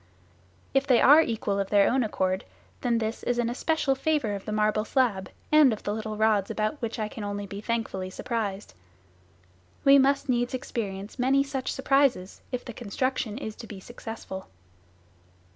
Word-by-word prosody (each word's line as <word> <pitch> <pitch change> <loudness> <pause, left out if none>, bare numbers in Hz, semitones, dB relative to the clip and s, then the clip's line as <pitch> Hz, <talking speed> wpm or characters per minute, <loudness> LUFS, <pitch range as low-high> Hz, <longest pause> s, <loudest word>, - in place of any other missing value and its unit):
If 270 +1 +2
they 250 -4 +5
are 295 +4 +8
equal 215 -7 -1
of 195 - -2
their 200 -1 +5
own 260 0 +2
accord, 190 -3 -1 0.4
then 240 -2 +1
this 220 0 -2
is 245 - -1
an 240 -1 0
especial 290 +2 +1
favour 270 -5 0
of 200 -1 -6
the 215 - -4
marble 215 0 +1
slab 220 -7 0 0.2
and 305 -4 +7
of 215 - -4
the 205 - -1
little 215 0 -4
rods, 215 -2 +2
about 215 +7 -2
which 230 0 -3
I 215 -2 -2
can 215 0 -8
only 205 0 -4
be 200 +1 -7
thankfully 215 -5 -2
surprised. 205 - -4 1.1
We 275 0 +8
must 275 +1 +2
experience 240 -4 -3
many 270 +2 +3
such 275 -2 -3
surprises 270 -8 +1
if 250 -1 -4
the 240 - -7
construction 240 0 -2
is 220 -5 -6
to 230 - -9
be 205 -2 -8
successful. 225 -3 -8
225 Hz, 170 wpm, -27 LUFS, 205-260 Hz, 1.1 s, are